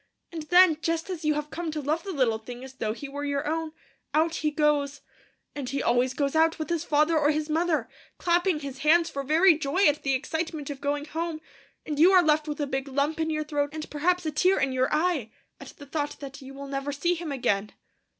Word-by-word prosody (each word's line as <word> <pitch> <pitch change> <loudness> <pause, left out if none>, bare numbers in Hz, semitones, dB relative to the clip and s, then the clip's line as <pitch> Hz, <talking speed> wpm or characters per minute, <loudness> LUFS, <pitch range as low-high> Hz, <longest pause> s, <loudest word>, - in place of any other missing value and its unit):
And 330 -2 -5
then, 355 -3 +6
just 330 +3 -1
as 345 -3 -5
you 305 -1 +2
have 300 0 -4
come 340 0 -4
to 310 0 -3
love 300 +3 -1
the 395 - -6
little 250 -8 +1
thing 245 +2 -9
as 265 0 -10
though 220 -5 -2
he 260 +6 -6
were 285 +1 -6
your 285 0 -2
own, 320 0 -2 0.4
out 325 +1 +2
he 305 - 0
goes. 295 -1 +1 0.5
And 275 -3 -5
he 275 +1 -2
always 245 +2 +2
goes 280 0 -1
out 320 +1 +3
with 315 +2 -4
his 335 -2 0
father 305 +2 +2
or 295 -1 +3
his 305 0 -1
mother, 330 0 +1 0.3
clapping 345 -2 +1
his 275 -2 -7
hands 330 +4 +3
for 275 - -3
very 320 +5 +5
joy 320 +7 +1
at 295 0 +3
the 270 -1 +1
excitement 315 +1 -3
of 275 - -8
going 290 0 -1
home, 325 +1 -4 0.5
and 300 -2 -3
you 360 +5 +7
are 365 -1 +7
left 310 -1 +2
with 300 0 -4
a 290 - 0
big 270 0 -3
lump 285 +4 -1
in 320 0 0
your 305 -1 -1
throat, 290 -1 -1
and 310 -1 -5
perhaps 355 +4 +1
a 310 - -1
tear 365 +6 +3
in 275 - +1
your 260 0 0
eye, 305 -7 +1 0.3
at - - -10
the 285 - -11
thought 290 +1 -3
that 275 0 -9
you 270 0 -10
will 280 0 -7
never 275 +1 -3
see 315 +5 0
him 335 -3 -5
again!' 210 -6 0
300 Hz, 235 wpm, -27 LUFS, 280-325 Hz, 0.5 s, you